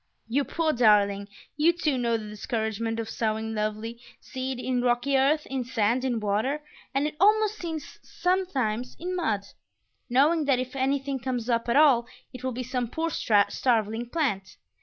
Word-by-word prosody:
You 270 +5 +1
poor 320 -2 0
darling! 205 -4 +3 0.3
You, 320 +3 +4
too, 310 -4 0
know 235 -2 +1
the 215 -1 -7
discouragement 220 +1 -3
of 225 - -3
sowing 220 0 -2
lovely 215 +2 -3 0.2
seed 260 0 -5
in 250 -1 0
rocky 245 +3 +1
earth, 285 +3 +3
in 265 -2 -3
sand, 240 0 0
in 245 -3 0
water, 220 +9 -1 0.3
and 275 +2 0
(it 300 - -3
almost 425 +2 +4
seems 320 -3 -6
sometimes) 270 - -1
in 365 +2 -3
mud; 225 - 0 0.7
knowing 295 +6 +3
that 275 -3 +3
if 255 +1 -4
anything 270 0 0
comes 245 -1 -2
up 235 0 0
at 235 - +2
all 270 -5 +5 0.3
it 255 0 -9
will 260 - -1
be 255 +1 -4
some 250 -1 -2
poor 325 +7 -2
starveling 225 0 +1
plant. 240 - -2
250 Hz, 165 wpm, -27 LUFS, 225-285 Hz, 0.7 s, all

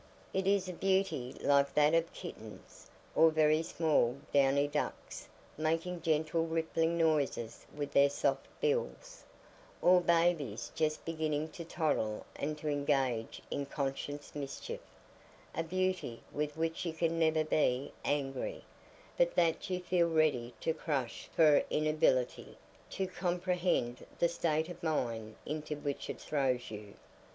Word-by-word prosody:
It 190 0 0
is 195 -2 +3
a 180 - -4
beauty 190 -9 0
like 140 -1 +3
that 150 +1 +5
of 165 0 +2
kittens, - - -10 0.2
or 160 - +6
very 155 0 +3
small 155 -7 +1 0.2
downy 140 +1 +4
ducks 150 +1 -4 0.3
making 165 +3 -1
gentle 160 +1 +1
rippling 165 +1 0
noises 150 -8 0
with 145 -1 -3
their 140 0 +5
soft 135 -1 0
bills, 485 +2 -2 0.6
or 180 0 +6
babies 165 -10 +1
just 155 -1 -1
beginning 155 -1 -1
to 170 +2 -8
toddle 150 -10 -1
and 150 +1 -3
to 150 - -6
engage 135 -6 0
in 140 -1 -2
conscious 145 +1 -4
mischief—a 145 +2 -8
beauty 185 -8 -1
with 150 +1 -3
which 165 +3 -1
you 170 -2 -2
can 165 0 0
never 160 -1 +3
be 140 -4 +1
angry, 145 - -2 0.6
but - - +3
that 165 +1 +2
you 180 -1 -1
feel 180 -1 +2
ready 150 -7 +1
to 160 - +1
crush 135 -8 -3
for 155 -3 +6
inability 155 -5 +1 0.3
to 190 - -2
comprehend 180 -8 -1
the 170 - +3
state 160 -2 0
of 175 - -9
mind 115 -9 -2
into 150 0 -3
which 145 -1 -4
it - - -5
throws 130 -5 -1
you. 105 -1 -8
155 Hz, 135 wpm, -33 LUFS, 140-170 Hz, 0.6 s, or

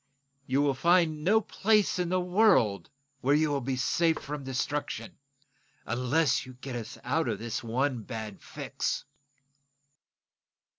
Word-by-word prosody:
You 135 +3 +2
can 140 -1 +2
find 165 +1 +2
no 215 +6 +4
place 210 -2 +2
in 175 -1 0
the 185 +1 +2
world 180 - +3 0.3
where 140 +2 +3
you 155 0 +2
will 140 -1 0
be 130 +1 -2
safe 160 +5 +2
from 145 0 -6
destruction 145 +7 -3 0.7
unless 125 +6 +1
you 130 - -11
get 130 0 -7
us 115 -3 -6
out - - 0
of - - -1
this 115 +1 -4
one 125 +2 0
bad 110 -3 -7
fix!" - - -3
140 Hz, 140 wpm, -29 LUFS, 125-170 Hz, 0.7 s, no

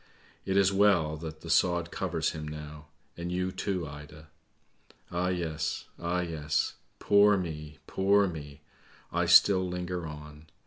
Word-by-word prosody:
It 95 0 0
is 100 0 +4
well 95 -6 +3
that 80 0 -8
the 85 - -9
sod 85 -1 +2
covers - - -1
him 75 -1 -6
now, 75 0 -8 0.3
and 85 +1 -5
you, 90 +1 -1
too, 95 -4 -3
Ida! 75 +1 -11 0.8
Ah, 90 +1 0
yes! 80 -3 -2
ah, 85 +1 -1
yes! 75 -3 -1 0.2
Poor 100 0 +5
me, 75 -4 -5
poor 100 +1 +3
me! 75 -4 -8 0.5
I 85 0 +1
still 95 +2 +7
linger 90 -1 -4
on. 75 0 -10
85 Hz, 140 wpm, -29 LUFS, 75-90 Hz, 0.8 s, still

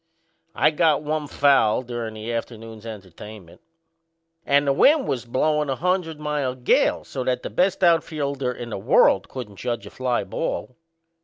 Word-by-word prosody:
I - - +4
got 155 -1 +2
one 150 0 -2
foul 135 -6 +3
durin' 120 -3 -5
the 110 +2 -5
afternoon's 115 -1 -6
entertainment; 100 -2 -11 0.9
and 140 +1 +3
the 140 - +2
wind 285 - +4
was 125 -3 -2
blowin' 150 +4 0
a 135 - 0
hundred 175 0 -1
mile 150 -4 -2
gale, 125 -1 +2
so 130 - -5
that 125 0 -1
the - - -5
best 190 +1 +1
outfielder 145 -6 +1
in 120 -1 -8
the 100 - -4
world - - +3
couldn't 110 -7 -8
judge 120 +1 -3
a - - -10
fly 125 -3 -1
ball. 100 +6 -4
130 Hz, 160 wpm, -23 LUFS, 115-150 Hz, 0.9 s, I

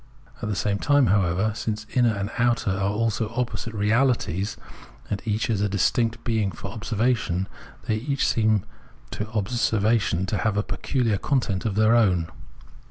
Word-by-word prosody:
At 105 - -3
the 105 - -1
same 100 0 0
time, 145 -2 +4
however, 95 +2 +1
since 110 -1 -3
inner 120 -4 +3
and 100 +2 -3
outer 120 -3 +2
are 100 +1 0
also 110 +1 -1
opposite 120 -2 -3
realities 105 -3 +1 0.5
and 100 - -1
each 110 +1 0
is 110 -4 0
a 105 - +1
distinct 115 +3 +1
being 110 -4 0
for 95 +4 -7
observation, 110 -4 0 0.4
they 110 - 0
each 140 +4 -1
seem 110 -3 +2 0.5
to 105 0 -4
obser 110 +1 0
vation 100 -4 +1
to 105 - -1
have 110 -2 0
a 105 - +2
peculiar 115 -6 -1
content 115 -7 0
of 105 -3 -1
their 110 +2 +4
own. 90 -8 +2
110 Hz, 165 wpm, -24 LUFS, 100-115 Hz, 0.5 s, time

